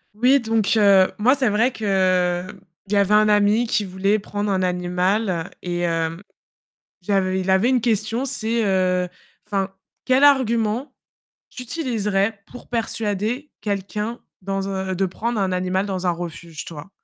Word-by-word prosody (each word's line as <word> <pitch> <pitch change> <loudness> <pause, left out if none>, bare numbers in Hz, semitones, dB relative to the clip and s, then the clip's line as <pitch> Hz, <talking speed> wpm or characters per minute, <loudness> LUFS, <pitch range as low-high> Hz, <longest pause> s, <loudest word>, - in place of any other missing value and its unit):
Oui, 255 +5 +4
donc, 225 -2 +1
heu, 200 -3 +5
moi, 235 +5 +4
c'est 265 -5 +2
vrai 225 +5 +2
que, 185 -3 +1 0.4
il 200 - -5
y - - +3
avait 200 +1 +3
un 215 0 +5
ami 210 +3 +3
qui 215 -1 0
voulait 195 +2 0
prendre 205 0 -3
un 190 - +1
animal, 180 0 0
et 175 -1 -3
hem, 165 0 -1 0.8
j'avais 190 0 0
il 185 - -5
avait 190 +7 +3
une 255 -2 +3
question, 225 +2 0
c'est, 235 -3 0
heu 185 -2 +1 0.4
enfin: 195 -1 -2 0.3
«Quel 260 +2 +4
argument 240 -2 +2 0.6
tu 250 - -8
utiliserais 220 -7 -1
pour 245 - -13
persuader 225 +3 -2
quelqu'un 210 +3 -3 0.2
dans 195 +1 -3
un 190 -1 -3
de 190 +1 0
prendre 225 +4 -3
un 190 -1 0
animal 185 +2 0
dans 190 -2 -3
un - - +3
refuge, 170 -2 -6
toi?». 160 +3 -9
200 Hz, 155 wpm, -22 LUFS, 185-225 Hz, 0.8 s, heu